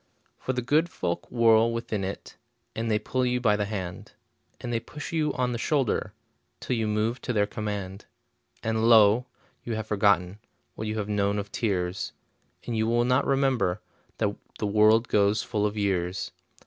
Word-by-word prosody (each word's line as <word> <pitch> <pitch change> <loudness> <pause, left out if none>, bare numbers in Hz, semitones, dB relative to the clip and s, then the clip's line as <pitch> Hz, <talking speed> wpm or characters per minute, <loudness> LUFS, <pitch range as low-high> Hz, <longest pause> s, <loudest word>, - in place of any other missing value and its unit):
For 130 - -2
the 125 -1 -2
good 155 +7 +2
folk 85 - -3
whirl 115 -1 +4
within 115 -3 -3
it, 95 +1 -6 0.4
And 115 +1 -2
they 105 - +3
pull 130 +4 -1
you 125 0 +1
by 110 -4 +3
the 105 0 -1
hand, 95 -4 -6 0.5
And 120 -1 -4
they 115 - +1
push 150 +7 -8
you 155 -2 +1
on 125 -2 0
the 120 - -3
shoulder, 135 -4 0 0.5
Till 125 - -2
you 110 -2 0
move 110 +3 0
to - - -3
their 105 -3 +2
command. 100 -2 -5 0.6
And 110 +1 +1
lo! 110 +2 +6 0.4
you 115 - -3
have 110 -1 -3
forgotten 100 -2 +2 0.3
What 110 - -5
you 110 +1 -2
have 105 -2 -2
known 100 -1 0
of 100 -1 -4
tears, 95 -4 -2 0.5
And 120 - -3
you 110 0 +1
will 120 +1 +2
not 125 +1 +2
remember 135 -9 +1 0.4
That - - 0 0.2
the - - -2
world 110 +3 +4
goes 105 +1 +2
full 105 -1 0
of 105 +1 -5
years. 95 -3 -1
110 Hz, 180 wpm, -27 LUFS, 100-120 Hz, 0.6 s, lo